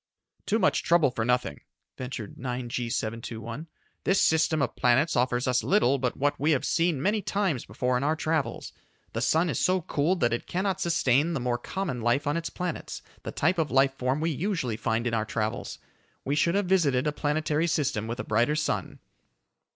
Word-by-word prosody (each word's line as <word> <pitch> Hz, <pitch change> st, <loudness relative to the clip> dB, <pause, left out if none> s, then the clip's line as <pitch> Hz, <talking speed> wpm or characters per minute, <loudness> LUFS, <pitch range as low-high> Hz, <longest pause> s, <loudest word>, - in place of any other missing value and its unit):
"Too 220 Hz, -, +2 dB
much 190 Hz, -5 st, +2 dB
trouble 170 Hz, -6 st, +3 dB
for 115 Hz, -, -2 dB
nothing," 125 Hz, -, 0 dB, 0.3 s
ventured 125 Hz, -5 st, -6 dB
9G 125 Hz, -1 st, -3 dB
721. 115 Hz, +6 st, -4 dB, 0.4 s
"This 195 Hz, -, +3 dB
system 160 Hz, 0 st, +3 dB
of 140 Hz, -4 st, -1 dB
planets 130 Hz, +7 st, +3 dB
offers 125 Hz, 0 st, +1 dB
us 125 Hz, 0 st, +2 dB
little 140 Hz, -9 st, +3 dB
but 125 Hz, -1 st, -1 dB
what 145 Hz, +1 st, 0 dB
we 150 Hz, +3 st, +1 dB
have 135 Hz, -, 0 dB
seen 165 Hz, -4 st, +1 dB
many 210 Hz, +1 st, +1 dB
times 195 Hz, -, -1 dB
before 125 Hz, +3 st, -1 dB
in 125 Hz, -, -2 dB
our 155 Hz, +2 st, +2 dB
travels. 155 Hz, -2 st, -2 dB, 0.4 s
The -, -, -2 dB
sun 165 Hz, +3 st, +2 dB
is 160 Hz, -, -1 dB
so 185 Hz, +1 st, +2 dB
cooled 170 Hz, +2 st, 0 dB
that 120 Hz, -1 st, +3 dB
it 120 Hz, -, -3 dB
cannot 190 Hz, +1 st, -1 dB
sustain 160 Hz, -2 st, +2 dB
the 155 Hz, -, -1 dB
more 120 Hz, -1 st, -1 dB
common 170 Hz, -4 st, -3 dB
life 120 Hz, +5 st, +1 dB
on 145 Hz, +2 st, 0 dB
its 170 Hz, 0 st, -2 dB
planets, 180 Hz, -3 st, -5 dB, 0.2 s
the -, -, -6 dB
type 170 Hz, +3 st, +1 dB
of 155 Hz, -3 st, +1 dB
life 135 Hz, 0 st, +3 dB
forms 135 Hz, +3 st, -1 dB
we 165 Hz, -, +1 dB
usually 160 Hz, -, -1 dB
find 115 Hz, +1 st, -1 dB
in 120 Hz, -, -1 dB
our 110 Hz, -1 st, +1 dB
travels. 110 Hz, -1 st, -3 dB, 0.5 s
We 140 Hz, -, 0 dB
should 170 Hz, +4 st, +2 dB
have 200 Hz, 0 st, +1 dB
visited 155 Hz, -9 st, +2 dB
a 150 Hz, -, +1 dB
planetary 150 Hz, +2 st, 0 dB
system 135 Hz, -9 st, 0 dB
with 120 Hz, +2 st, -4 dB
a -, -, -2 dB
brighter 120 Hz, +7 st, +1 dB
sun." 150 Hz, 0 st, -2 dB
140 Hz, 195 wpm, -27 LUFS, 125-165 Hz, 0.5 s, trouble